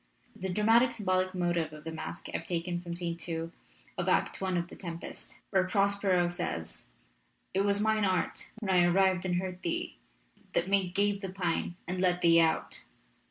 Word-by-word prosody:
The 190 - -4
dramatic 225 +6 +4
symbolic 185 -4 0
motive 175 -3 0
of 150 0 -10
the 160 - -5
masque 160 +2 -6
I - - +1
have 165 - -12
taken 175 0 -2
from 170 -1 -5
Scene 170 -1 -3
2 165 -1 -3 0.5
of - - 0
Act - - +1
I 190 -1 0
of 170 0 -1
The - - -11
Tempest, 170 -3 -8
where 190 -2 +4
Prospero 195 -2 +2
says: 175 - -4 0.7
It 190 - +2
was 200 0 +2
mine 220 0 +2
art 185 -3 0
When 200 -3 -1
I 180 -1 +6
arrived 185 +1 +3
and 180 - +1
heard 180 0 -3
thee, 170 - -2 0.6
that - - +1
made 190 -2 +2
gape 200 0 +2
The 195 - -4
pine 175 -2 -1
and 180 +1 -2
let 180 -1 +2
thee 165 -1 +6
out. 160 -1 +1
180 Hz, 185 wpm, -30 LUFS, 170-195 Hz, 0.7 s, I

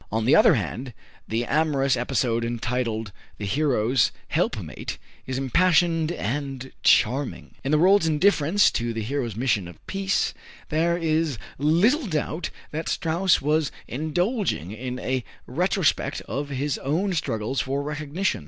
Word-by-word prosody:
On 110 +1 0
the - - +5
other - - +6
hand, 125 0 -4 0.3
the 115 +2 -1
amorous 140 -3 +2
episode, 120 -2 0
entitled 115 -2 -2 0.3
"The 105 - -5
Hero's 125 -1 +2 0.2
Helpmate," - - -2 0.3
is 130 0 -2
impassioned 165 +3 +3
and 135 -1 -4
charming. 130 +5 +2
In 135 - -2
the 155 - +5
world's 185 +1 +5
indifference 160 +3 +3
to 120 0 -2
the 110 -1 -3
hero's 120 -2 -2
mission 115 -6 0
of 85 -2 -11
peace, 195 0 0 0.4
there 170 +3 +1
is 160 -4 0 0.2
little 205 - +3
doubt 155 0 -2 0.2
that 160 +2 -3
Strauss 170 +3 +2
was 150 0 +1 0.2
indulging 160 - -1
in 125 +3 -5
a 130 -1 -2 0.2
retrospect 180 - 0
of 145 +1 -4
his 140 +1 -2
own 180 +8 0
struggles 130 -5 -1
for 140 +2 -2
recognition. 150 +5 -2
145 Hz, 135 wpm, -25 LUFS, 125-165 Hz, 0.4 s, other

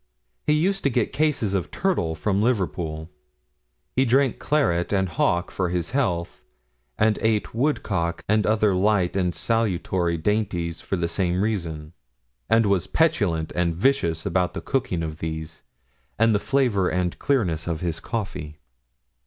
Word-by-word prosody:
He 150 - +4
used 190 +6 +1
to - - +5
get 120 -3 0
cases 145 -10 +1
of 95 -3 -1
turtle 170 - 0
from 100 +4 0
Liverpool. 85 -8 -1 0.8
He 130 - +4
drank 135 +1 +2
claret 110 - +1
and 95 -2 +2
hock 85 +1 0
for 90 -2 -1
his 90 +1 -2
health, 95 -11 -1 0.5
and 110 0 +2
ate 110 -2 0
woodcock 105 - -1
and 110 0 +2
other 105 -2 +3
light 95 -1 +2
and 90 -3 0
salutary 95 -6 0
dainties 90 -3 -1
for - - -2
the 85 -2 -1
same 90 +2 0
reason; 85 -7 -3 0.6
and 115 0 +4
was 95 -3 +1
petulant 95 - +1
and 85 -1 0
vicious 85 - +1
about 90 -2 0
the - - -4
cooking 125 -11 -1
of 80 -1 -5
these, 80 0 -5 0.6
and 115 0 +4
the 105 - +2
flavour 120 -8 +1
and 90 -1 -1
clearness 90 - 0
of 80 -2 -2
his 85 -3 -2
coffee. 90 -9 -5
95 Hz, 150 wpm, -24 LUFS, 85-115 Hz, 0.8 s, to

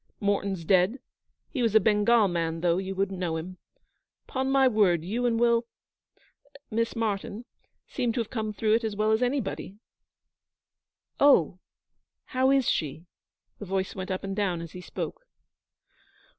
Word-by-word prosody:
Morten's 200 -3 -1
dead 185 +6 +3 0.5
he 265 - -2
was 225 -3 +1
a - - +9
Bengal 210 +2 +4
man, 165 -2 -2
though; 175 0 +2
you 190 0 -4
wouldn't 195 -1 -1
know 170 -3 -1
him. 180 +3 -7 0.7
'Pon 265 0 -2
my 270 -1 +4
word, 190 -8 +2
you 240 +6 -1
and 230 -1 +1
Will 235 0 +3 1.0
Miss 230 +1 -1
Martyn 220 0 -3 0.4
seem 245 -3 -1
to 245 - -2
have 230 - -3
come 220 -3 -2
through 215 +1 +1
it 230 +1 +2
as 220 -2 -2
well 215 +1 +1
as 220 +2 +2
anybody.' 245 -6 -2 1.4
'Oh, 185 - +4 0.7
how 260 +1 +1
is 270 -2 +3
she?' 155 +2 -1 0.5
The 205 - -6
voice 190 0 -2
went 185 0 -6
up 185 0 -3
and 195 0 -4
down 190 -5 0
as 165 -1 -8
he 180 - -9
spoke. - - -6
205 Hz, 155 wpm, -27 LUFS, 185-235 Hz, 1.4 s, a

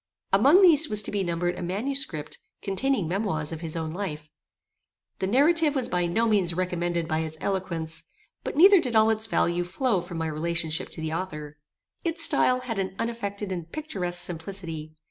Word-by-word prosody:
Among 345 +8 +6
these 320 -4 +6
was 210 -1 +4
to - - -5
be 200 -1 0
numbered 175 0 -2
a - - -5
manuscript, 195 - -2 0.2
containing 205 0 0
memoirs 170 -4 -2
of 165 -1 -6
his 165 -1 -3
own 160 -1 -3
life. 155 -5 -5 0.9
The 190 - -1
narrative 295 - +3
was 260 -3 +1
by 180 -1 0
no 225 +7 +1
means 190 -6 +2
recommended 175 -2 -1
by 155 -1 0
its 160 0 -4
eloquence; 170 -4 -3 0.4
but - - -5
neither 385 +4 +8
did 250 -6 -3
all 220 0 +5
its 220 0 0
value 175 -4 +1
flow 195 +2 0
from 175 -1 -7
my 165 - -2
relationship 160 0 -2
to - - -7
the 160 0 -3
author. 150 -4 -5 0.5
Its 330 -1 +1
stile 255 -6 +4
had 230 -5 -4
an 190 0 -3
unaffected 205 -4 -4
and 170 -3 -5
picturesque 185 -13 -4
simplicity. 165 -3 -5
185 Hz, 180 wpm, -26 LUFS, 165-230 Hz, 0.9 s, neither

